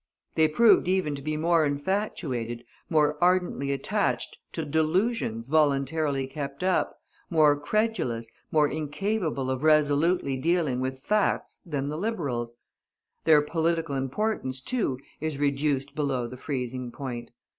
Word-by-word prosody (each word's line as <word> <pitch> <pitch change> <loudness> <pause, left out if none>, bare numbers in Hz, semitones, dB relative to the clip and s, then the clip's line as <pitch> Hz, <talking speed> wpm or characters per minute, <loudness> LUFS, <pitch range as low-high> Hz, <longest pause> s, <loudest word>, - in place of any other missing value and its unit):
They 160 -1 +4
proved 220 +5 +5
even 185 -5 +1
to 140 - -6
be 155 +2 -2
more 165 +1 +3
infatuated, 145 - -2 0.3
more 150 -1 +2
ardently 180 -6 +2
attached 140 - -1
to - - -3
delusions 160 - 0
voluntarily 145 -1 +2
kept 140 +2 -6
up, 185 0 +1 0.3
more 155 -3 +5
credulous, 145 - -1 0.2
more 150 -1 +4
incapable 155 -2 -2
of 130 0 -2
resolutely 150 -1 +3
dealing 155 -3 +1
with 130 0 -3
facts 210 -1 0
than 145 -4 -3
the 150 - -3
Liberals. 140 - -2 0.7
Their 155 -2 +6
political 165 0 0
importance, 135 0 -1
too, 170 - -1 0.2
is 155 -2 -3
reduced 140 -1 0
below 135 -5 -1
the 120 - -7
freezing 125 -2 -4
point. 120 -3 -6
150 Hz, 125 wpm, -27 LUFS, 135-165 Hz, 0.7 s, Their